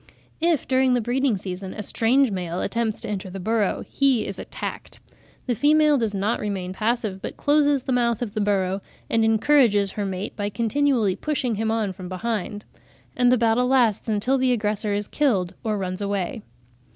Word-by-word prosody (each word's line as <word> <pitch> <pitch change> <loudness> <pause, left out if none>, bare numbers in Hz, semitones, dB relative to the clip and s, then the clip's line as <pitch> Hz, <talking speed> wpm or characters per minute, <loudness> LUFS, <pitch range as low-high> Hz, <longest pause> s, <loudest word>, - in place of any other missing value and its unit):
If, 330 -3 +1
during 260 -1 +3
the - - +2
breeding 245 0 0
season, 185 0 -6
a 210 - -5
strange 245 +5 +2
male 180 -2 -3
attempts 230 -2 -1
to - - -4
enter 195 -2 -4
the 195 +1 -7
burrow, 215 +1 0
he 270 -5 +2
is 195 - -6
attacked; - - -6 0.5
the 250 - 0
female 300 +3 +4
does 220 -3 -1
not 205 +4 0
remain 190 -3 -3
passive, 215 -2 -1
but - - -6
closes 290 -2 +2
the 265 - -3
mouth 240 -2 +1
of 210 -4 -6
the 215 - -1
burrow, 195 -1 0 0.3
and 225 -1 +3
encourages 220 -3 +3
her 205 - -3
mate 190 +2 -5
by 205 -1 -2
continually 235 -2 +1
pushing 265 0 -1
him 220 +1 -1
on 220 -3 0
from 185 -1 -9
behind; 205 +1 -3 0.5
and 245 -1 +4
the 255 - +4
battle 235 +2 +2
lasts 240 -5 +2
until 220 +6 +1
the 255 0 +2
aggressor 210 -2 0
is 205 0 -2
killed 205 -12 0
or 215 -2 -1
runs 185 0 -3
away. 200 +1 -2
220 Hz, 185 wpm, -23 LUFS, 200-250 Hz, 0.5 s, female